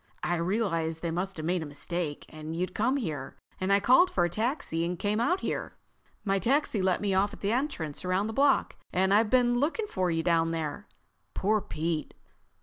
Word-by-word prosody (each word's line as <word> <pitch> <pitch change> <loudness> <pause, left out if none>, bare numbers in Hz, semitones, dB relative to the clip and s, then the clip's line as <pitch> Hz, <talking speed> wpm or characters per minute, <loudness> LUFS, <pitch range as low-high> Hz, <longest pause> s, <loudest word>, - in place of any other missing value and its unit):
I 175 - +1
realized 170 -3 -1
they 170 - -1
must 180 +3 -3
have 155 - -4
made 175 +1 0
a - - -4
mistake, 150 +1 -3
and 155 +1 -7
you'd 180 +2 -2
come 255 +6 +1
here, 155 - -4 0.2
and 185 +1 0
I 200 - +5
called 260 - +5
for 175 - +1
a 175 - -2
taxi 215 - -1
and 175 +1 -2
came 210 +4 0
out 355 +11 +1
here. - - -3 0.5
My 195 -1 +2
taxi 240 - +1
let 185 -1 +1
me 200 -2 0
off 195 +2 +2
at - - -11
the 200 - 0
entrance 230 - -2
around 185 +2 +1
the 220 - -3
block, 280 +3 +2
and 190 +2 +2
I've 210 +1 +4
been 245 -1 +3
looking 330 - 0
for 185 - -1
you 165 -1 0
down 165 -1 +2
there.... 165 +4 -4 0.5
Poor 215 +2 +2
Pete!" 160 -2 -3
185 Hz, 205 wpm, -29 LUFS, 165-220 Hz, 0.5 s, I